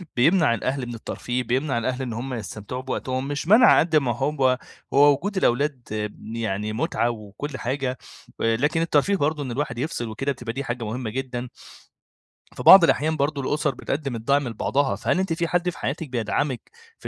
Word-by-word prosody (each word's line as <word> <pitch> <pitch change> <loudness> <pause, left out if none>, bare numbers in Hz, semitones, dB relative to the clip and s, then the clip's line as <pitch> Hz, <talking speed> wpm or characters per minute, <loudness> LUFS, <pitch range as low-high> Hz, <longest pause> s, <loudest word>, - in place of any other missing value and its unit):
بيمنع 150 0 +4
الأهل 130 +3 -2
من 120 - -6
الترفيه، 125 +2 -3
بيمنع 130 +2 0
الأهل 130 +3 -2
إن 120 -3 -3
هُم 125 +3 -4
يستمتعوا 110 +2 -6
بوقتهم، 130 0 -3
مش 145 +2 -3
منْع 230 +5 +7
قدّ 160 -1 +1
ما 125 -6 +2
هو 135 -4 +1 0.4
هو 145 +1 +7
وجود 200 +7 -4
الأولاد 140 -3 +1 0.5
يعني 110 -2 -2
متعة 120 +1 0
وكل 120 +6 -6
حاجة، 130 0 -2 0.4
آآ، 115 0 +2
لكن 150 +5 +1
الترفيه 165 +4 +2
برضو 150 -2 0
إن 130 - -5
الواحد 125 -2 -3
يفصل 120 -4 -3
وكده، 135 +6 -2
بتبقى 120 -3 -5
دي 140 +2 -3
حاجة 120 -2 -4
مهمة 115 +1 -4
جدًا. 125 0 -4 1.1
في - - -7
بعض 190 -3 +10
الأحيان 155 -1 +2
برضو 140 0 0
الأُسَر 150 0 -1
بتقدم 140 -3 -3
الدعم 140 +4 +1
لبعضها، 135 +5 0
فهل 185 - 0
أنتِ 190 -3 0
في 170 +1 -1
حد 175 +1 +1
في - - -8
حياتِك 150 +1 -3
بيدعمِك 125 - -2 0.3
في - - -7
135 Hz, 180 wpm, -24 LUFS, 120-150 Hz, 1.1 s, بعض